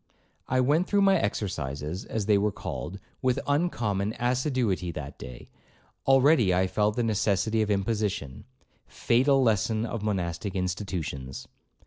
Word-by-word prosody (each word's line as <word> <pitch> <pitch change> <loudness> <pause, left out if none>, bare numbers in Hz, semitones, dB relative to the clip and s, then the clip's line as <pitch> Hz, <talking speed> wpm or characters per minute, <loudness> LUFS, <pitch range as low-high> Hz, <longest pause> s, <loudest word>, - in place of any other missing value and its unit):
I 130 0 +2
went 150 +8 +2
through 200 -1 +3
my 195 0 +5
exercises 80 -4 -3
(as 110 -3 -3
they 105 -1 +4
were 105 +1 +1
called) 95 0 -6 0.2
with 130 +1 +1
uncommon 115 - 0
assiduity 125 - 0
that 70 -2 -7
day; 60 -1 -9 0.6
already 135 - +5
I 95 +1 +3
felt 105 +2 0
the 120 - 0
necessity 110 0 +1
of 105 - 0
imposition,—fatal 110 - -1
lesson 110 0 +1
of 115 -1 -4
monastic 95 -2 -2
institutions. 90 -8 -4
105 Hz, 125 wpm, -27 LUFS, 95-125 Hz, 0.6 s, my